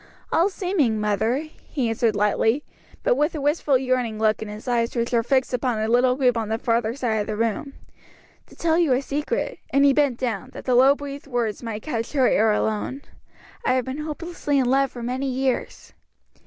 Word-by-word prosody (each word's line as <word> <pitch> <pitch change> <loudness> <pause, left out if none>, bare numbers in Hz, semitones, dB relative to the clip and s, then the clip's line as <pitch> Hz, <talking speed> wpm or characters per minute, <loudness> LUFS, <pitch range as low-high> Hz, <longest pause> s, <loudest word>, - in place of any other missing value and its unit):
"All 345 +4 +3
seeming, 355 - 0
mother," 220 +7 0 0.2
he 265 -6 -1
answered 225 -1 +1
lightly, 220 +6 +2 0.4
but - - +4
with 300 -2 0
a - - -3
wistful 290 -1 +2
yearning 250 -4 -1
look 215 0 +1
in 220 - -4
his 210 +4 -9
eyes 235 0 0
which 235 0 -1
were 235 -2 +3
fixed 260 +2 +1
upon 250 -2 0
a 215 0 -1
little 250 +2 +3
group 255 -2 +2
on 220 -2 -2
the 220 - 0
farther 230 0 0
side 240 -5 -1
of 210 - -2
the 215 - -2
room; 230 +5 -1 0.7
"to - - -17
tell 330 0 +1
you 320 -7 +3
a 250 - +1
secret," 300 - -2
and 280 +1 +4
he 280 - +5
bent 280 -4 +2
down, 245 -1 -3
that - - -9
the 255 - +1
low 265 +3 +6
breathed 285 0 -8
words 240 -5 -2
might 225 -3 -5
catch 230 -5 -3
her 265 -4 +4
ear 220 0 +3
alone, 220 +6 -1 0.6
"I 255 - +2
have 255 -2 0
been 260 +3 -5
hopelessly 305 -1 -3
in 265 - +3
love 270 +2 +2
for 240 -1 -8
many 260 +3 -2
years." 260 0 -2
255 Hz, 210 wpm, -23 LUFS, 225-280 Hz, 0.7 s, low